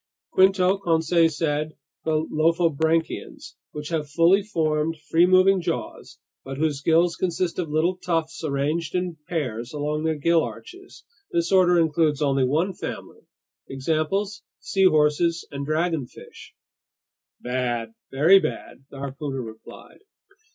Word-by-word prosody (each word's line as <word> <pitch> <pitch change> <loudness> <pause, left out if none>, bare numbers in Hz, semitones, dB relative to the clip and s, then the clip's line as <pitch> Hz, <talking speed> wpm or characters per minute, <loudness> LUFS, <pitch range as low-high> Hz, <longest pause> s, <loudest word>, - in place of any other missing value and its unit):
"Quinto," 190 0 +3
Conseil 165 -2 +2
said, 155 0 -2 0.3
"the 155 0 0
lophobranchians, 160 0 0 0.2
which 150 0 -7
have 155 -3 -2
fully 170 +6 +4
formed, 160 -5 -1
free 170 +2 +5
moving 185 +1 +4
jaws - - -5 0.3
but 135 0 -7
whose 150 -2 -1
gills 165 +3 +3
consist 180 -1 -2
of 170 -4 -2
little 165 +4 +1
tufts 165 -3 -3
arranged 155 +3 -2
in 180 -2 -2
pairs 125 - -4
along 150 +1 -2
their 160 0 0
gill 165 +3 +2
arches. 370 +1 -10 0.3
This 340 - 0
order 180 -2 +5
includes 155 -2 +1
only 135 -2 +1
one 160 +9 +1
family. - - -8 0.4
Examples: 160 +9 -2 0.2
seahorses 170 - +2
and 140 0 -5
dragonfish." 155 -4 -4 0.8
"Bad, 125 - -3 0.2
very 160 +9 +5
bad!" 135 - -6
the 140 - -11
harpooner 135 -1 -5
replied. 110 -1 -12
160 Hz, 125 wpm, -24 LUFS, 150-175 Hz, 0.8 s, free